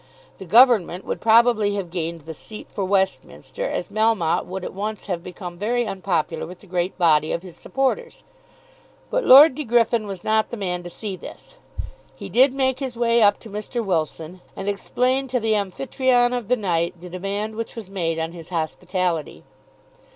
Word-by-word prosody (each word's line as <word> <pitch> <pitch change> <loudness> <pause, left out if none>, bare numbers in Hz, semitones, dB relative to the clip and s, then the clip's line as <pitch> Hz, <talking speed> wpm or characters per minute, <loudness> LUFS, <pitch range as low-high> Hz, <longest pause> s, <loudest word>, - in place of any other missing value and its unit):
The 190 - -8
Government 215 -4 +5
would - - -4
probably 220 -2 +4
have 190 -4 -4
gained 170 -2 -3
the 160 +2 -8
seat 215 +7 -10
for 200 - -3
Westminster, 195 - -1
as - - -3
Melmotte 215 -7 +1
would 190 0 -5
at - - -6
once 210 +2 -4
have 175 -4 -3
become 180 -1 -8
very 240 +4 0
unpopular 180 -6 -2
with 180 +1 -11
the - - -16
great 180 0 -2
body 155 -4 +3
of 170 - -2
his 180 -3 -11
supporters. 270 - -2 0.9
But - - +1
Lord 280 +3 +9
De 300 - -4
Griffin 230 -2 +2
was 195 -3 -7
not 220 0 +1
the 240 - -6
man 180 -3 -2
to 175 - -8
see 200 +2 -5
this. - - -12 0.6
He - - -8
did 260 +2 +5
make 260 -1 0
his 260 -4 -5
way 235 0 +3
up 205 -1 +4
to 225 - -11
Mr. 215 +3 -4
Wilson, 165 0 -2
and 195 - -6
explained 255 +6 0
to 250 0 0
the 220 -1 +1
Amphytrion 245 +5 +1
of 240 -4 -4
the 250 +2 +2
night 170 -5 -1
the 180 - -10
demand 195 +4 -4
which 230 +2 -5
was 225 -4 -7
made 170 -4 -2
on 165 0 -2
his 170 -2 -11
hospitality. 175 -1 -2
200 Hz, 185 wpm, -22 LUFS, 175-235 Hz, 0.9 s, Lord